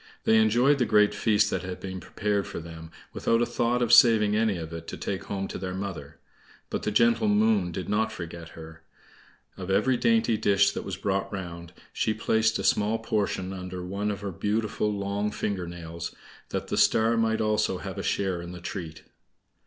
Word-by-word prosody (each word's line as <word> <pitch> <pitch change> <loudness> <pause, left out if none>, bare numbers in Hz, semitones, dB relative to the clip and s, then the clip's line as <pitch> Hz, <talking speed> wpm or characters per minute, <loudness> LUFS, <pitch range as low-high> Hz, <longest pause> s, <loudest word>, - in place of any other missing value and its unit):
They 110 - +4
enjoyed 120 +6 +4
the 125 - +3
great 105 -2 +4
feast 105 -2 +2
that - - -1
had 90 0 -6
been 95 -1 -6
prepared 100 +1 -2
for - - -6
them, 80 -1 -10 0.2
without 115 - +1
a 120 - +3
thought 120 +1 0
of 120 0 +2
saving 110 -5 +6
any 110 -3 +1
of 80 0 -7
it 85 - -7
to - - -6
take 95 -2 -4
home 95 -1 -3
to - - -5
their 90 0 -4
mother; 95 -7 -6 0.5
but - - -2
the - - -1
gentle 115 +1 +3
Moon 105 -3 +3
did 90 +2 -5
not 110 +2 +1
forget 85 -4 -8
her. 80 0 -11 0.8
Of 95 0 -6
every 105 +7 +2
dainty 225 - +2
dish 100 -1 +3
that - - -4
was - - -4
brought 100 -1 -1
round, 85 -3 -7 0.2
she 110 - 0
placed 110 0 +1
a - - -4
small 105 +2 +2
portion 100 -4 -2
under 90 -1 -6
one 100 +3 -2
of 100 -2 -4
her 100 -1 -4
beautiful 105 +3 -1
long 100 +1 -2
finger 100 -4 -3
nails, 85 -1 -7 0.3
that - - -4
the - - -1
Star 115 +1 +4
might 110 -1 +1
also 105 -3 +1
have - - -6
a - - -1
share 95 -3 -1
in 85 +1 -8
the 90 - -8
treat. 85 -2 -7
100 Hz, 200 wpm, -27 LUFS, 90-110 Hz, 0.8 s, saving